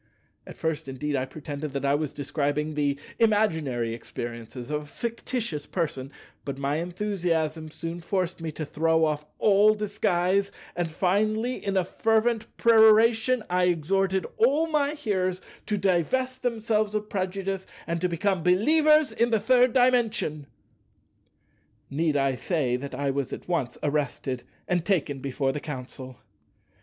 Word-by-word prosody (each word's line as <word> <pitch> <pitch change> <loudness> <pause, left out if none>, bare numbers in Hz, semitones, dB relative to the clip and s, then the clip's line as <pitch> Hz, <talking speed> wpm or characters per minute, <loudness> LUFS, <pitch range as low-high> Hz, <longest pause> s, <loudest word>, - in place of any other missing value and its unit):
At - - -10
first, 160 -2 -2
indeed, 145 +2 -3
I 130 -1 0
pretended 145 0 -6
that 140 0 -2
I 140 - +3
was 150 -1 0
describing 145 +1 -2
the 145 -1 0 0.2
imaginary 160 - +1
experiences 120 +2 -7
of 150 0 -1
a - - -11
fictitious 230 - -4
person; 145 -6 -3 0.3
but 140 -1 -5
my 140 +2 -1
enthusiasm 170 -3 -1
soon 165 +2 -6
forced 180 0 -2
me 160 -1 -3
to 155 - -4
throw 160 +2 +2
off 150 -1 -2
all 210 +1 +5
disguise, 200 -2 +1 0.2
and 175 -2 -1
finally, 215 +8 0
in 195 -1 0
a 185 - +2
fervent 225 +3 +1
peroration, 225 +1 +5
I 180 0 +2
exhorted 190 +3 +1
all 280 +8 +4
my 300 -2 +1
hearers 190 -10 -1 0.3
to 210 - 0
divest 230 +8 0
themselves 220 -3 0
of 210 0 -2
prejudice 195 -1 -3 0.2
and 170 0 -2
to 180 - +1
become 185 +2 0
believers 305 - +4
in 235 +1 +1
the 225 -2 +2
Third 250 +3 +4
Dimension. 230 - +2 1.4
Need 150 +1 +1
I 135 -1 +2
say 140 -8 0
that 135 +1 -5
I 140 +1 0
was 135 -1 -2
at - - -8
once 160 -9 -1
arrested 140 -3 -1 0.3
and 175 -2 +1
taken 160 -7 0
before 135 0 -1
the 150 - -4
Council? 130 -3 -8
175 Hz, 145 wpm, -26 LUFS, 150-215 Hz, 1.4 s, all